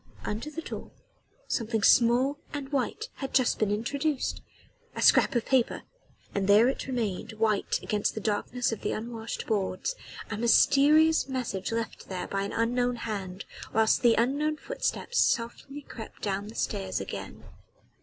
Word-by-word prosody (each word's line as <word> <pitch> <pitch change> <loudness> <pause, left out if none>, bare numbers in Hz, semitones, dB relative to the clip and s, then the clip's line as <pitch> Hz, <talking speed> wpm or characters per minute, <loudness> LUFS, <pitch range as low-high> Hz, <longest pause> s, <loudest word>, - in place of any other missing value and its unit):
Under 220 +8 -3
the 320 +2 -6
door - - -7 0.6
something 225 -2 -1
small 250 +6 +4
and 285 -2 -5
white 295 - -2
had 270 -2 -5
just 255 -3 +3
been 215 - +2
introduced 275 +7 -1 0.5
a - - -3
scrap - - +5
of 235 - +1
paper; 260 -3 +1 0.5
and 195 -1 -1
there 210 +4 +6
it 265 - -4
remained 225 -6 -2
white 215 -2 +1
against 210 -1 0
the - - -2
darkness 220 +4 -1
of 225 - -4
the - - -1
unwashed 225 0 -5
boards 205 - -1 0.4
a 215 - -2
mysterious 290 +7 +5
message 230 -7 -3
left 230 -1 -4
here 185 -2 -3
by 195 - -2
an 200 - -3
unknown 245 +2 +1
hand, 195 -5 -5 0.3
whilst 220 0 +3
the 235 -3 +5
unknown 290 +6 +1
footsteps 485 +3 -2
softly 265 +4 0
crept 225 -4 -10
down 200 0 -2
the 220 - -10
stairs 95 -1 -2
again. - - -7
230 Hz, 155 wpm, -28 LUFS, 210-270 Hz, 0.6 s, there